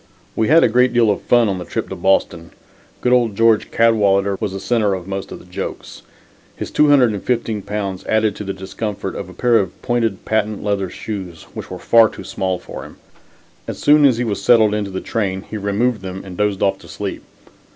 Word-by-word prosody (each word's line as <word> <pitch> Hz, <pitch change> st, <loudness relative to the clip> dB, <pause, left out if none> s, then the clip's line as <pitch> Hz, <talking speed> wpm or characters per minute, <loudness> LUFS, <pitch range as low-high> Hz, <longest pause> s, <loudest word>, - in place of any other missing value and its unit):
We 110 Hz, -, +1 dB
had 160 Hz, +3 st, +6 dB
a -, -, +6 dB
great 125 Hz, +2 st, +3 dB
deal 115 Hz, -3 st, +4 dB
of 100 Hz, -, -2 dB
fun 120 Hz, -2 st, +3 dB
on 95 Hz, -2 st, -2 dB
the -, -, -5 dB
trip 85 Hz, -, -4 dB
to -, -, -5 dB
Boston. 85 Hz, -3 st, 0 dB, 0.5 s
Good 125 Hz, -, +2 dB
old 120 Hz, -4 st, +2 dB
George 115 Hz, -1 st, +3 dB
Cadwalader 100 Hz, -4 st, +3 dB
was 100 Hz, -, -2 dB
the 95 Hz, -, -5 dB
center 105 Hz, -1 st, +1 dB
of 90 Hz, -2 st, -7 dB
most 95 Hz, 0 st, -5 dB
of -, -, -6 dB
the -, -, -16 dB
jokes. 90 Hz, -, -7 dB, 0.5 s
His -, -, -6 dB
215 120 Hz, -6 st, +2 dB
pounds 100 Hz, -2 st, -4 dB
added 110 Hz, -2 st, +1 dB
to -, -, -5 dB
the 100 Hz, -, -4 dB
discomfort 95 Hz, +1 st, -5 dB
of 95 Hz, -, -6 dB
a -, -, -11 dB
pair 120 Hz, +3 st, +3 dB
of 95 Hz, -3 st, -4 dB
pointed 115 Hz, -5 st, -1 dB
patent 110 Hz, -1 st, -1 dB
leather 100 Hz, -2 st, -1 dB
shoes, 95 Hz, -6 st, -7 dB
which -, -, -7 dB
were -, -, -6 dB
far 115 Hz, -2 st, +5 dB
too -, -, -10 dB
small 95 Hz, -2 st, -2 dB
for -, -, -9 dB
him. -, -, -13 dB, 0.7 s
As -, -, -5 dB
soon 150 Hz, 0 st, +5 dB
as 130 Hz, -5 st, +5 dB
he 125 Hz, -, 0 dB
was 105 Hz, -4 st, -2 dB
settled 110 Hz, 0 st, +4 dB
in 105 Hz, -2 st, -2 dB
the 95 Hz, -, -4 dB
train 95 Hz, -4 st, -2 dB
he 110 Hz, -, -9 dB
removed 105 Hz, +3 st, 0 dB
them 95 Hz, 0 st, -7 dB
and 95 Hz, -2 st, -9 dB
dozed 105 Hz, -1 st, 0 dB
off 95 Hz, 0 st, +1 dB
to 85 Hz, -, -15 dB
sleep. 95 Hz, +4 st, -5 dB
105 Hz, 215 wpm, -19 LUFS, 95-115 Hz, 0.7 s, had